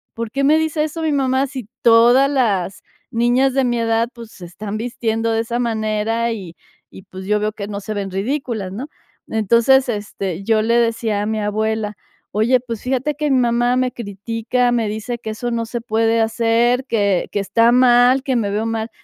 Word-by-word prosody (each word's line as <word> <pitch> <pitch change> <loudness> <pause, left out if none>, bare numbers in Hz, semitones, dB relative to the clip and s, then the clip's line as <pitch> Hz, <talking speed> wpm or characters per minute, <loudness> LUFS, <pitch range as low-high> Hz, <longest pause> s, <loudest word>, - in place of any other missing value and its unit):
¿por 230 -1 -5
qué 275 +3 -1
me 300 +3 +5
dice 315 -1 0
eso 315 +1 -4
mi 315 - +1
mamá 265 -1 +1
si 260 -5 -7 0.2
todas 240 +4 +6
las 200 -9 0 0.3
niñas 245 +3 +2
de 270 0 +2
mi 240 -1 0
edad, 225 0 +1
pues, 230 -2 -11
se 180 - -11
están 200 +4 -6
vistiendo 225 -1 -2
de 225 - +1
esa 235 +1 -3
manera?", 225 0 -1
y 185 -6 -8 0.4
y 190 - -12
pues 190 0 -10
yo 210 +1 +1
veo 210 0 -1
que 200 -1 -6
no 205 -1 -5
se 215 - -5
ven 200 -2 -4
ridículas, 220 -1 -3
¿no? 250 +8 -6 0.4
Entonces, 235 +5 +3
este, 200 -4 -4
yo 220 +1 +2
le 230 +1 +2
decía 230 -3 +1
a - - -2
mi 220 0 -1
abuela: 215 0 -1 0.4
"Oye, 230 +5 +2
pues 230 -3 -6
fíjate 265 +3 -1
que 295 0 -1
mi 265 - +4
mamá 240 0 +2
me 255 0 +1
critica, 230 +3 -2
me 230 -3 0
dice 220 +3 -4
que 220 -1 -5
eso 240 +3 -4
no 230 -1 -1
se 240 +1 -4
puede 225 0 +1
hacer, 230 +3 +1
que 200 -7 +1
que - - -1
está 230 +4 +3
mal, 250 +1 +5
que 265 -2 -1
me 210 -3 -1
veo 210 +2 -1
mal". 225 0 -2
230 Hz, 200 wpm, -19 LUFS, 215-245 Hz, 0.4 s, todas